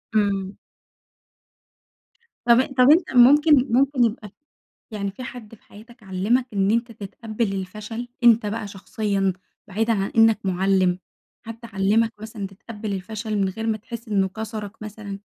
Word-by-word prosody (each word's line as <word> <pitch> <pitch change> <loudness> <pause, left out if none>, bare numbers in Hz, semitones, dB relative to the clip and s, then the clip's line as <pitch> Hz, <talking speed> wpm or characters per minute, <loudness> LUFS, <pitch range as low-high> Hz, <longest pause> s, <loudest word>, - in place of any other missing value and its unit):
إمم. 200 -2 +1 1.9
طَب 250 +3 +4
طَب 250 +2 +6
أنت 335 +2 +3
ممكن 285 +2 +6
ممكن 270 -1 +3
يبقى 215 -3 -2 0.6
يعني 200 -2 -3
في 255 +6 -9
حد 230 -3 -9
في - - -29
حياتك 230 +2 -16
علّمك 200 +7 0
إن 195 +1 +2
أنت 235 +1 0
تتقبّل 215 0 -4
الفشل، 210 +5 -6 0.2
أنت 230 -2 +6
بقى 210 0 -3
شخصيًا، 195 -1 -2 0.3
بعيدًا 225 +3 0
عن 195 -1 -1
إنّك 225 -1 +5
مُعلم، 185 -1 +1 0.5
حد 230 0 -8
علّمك 220 +1 +1
مثلًا 215 -2 -6
تتقبل 210 +1 -7
الفشل 215 +3 -4
من 195 -1 +1
غير 225 +4 -5
ما 220 -1 0
تحس 235 +1 -9
إنّه 195 -2 +1
كسَرك 215 +1 -7
مثلًا؟ 210 -1 -7
215 Hz, 140 wpm, -23 LUFS, 195-230 Hz, 1.9 s, طَب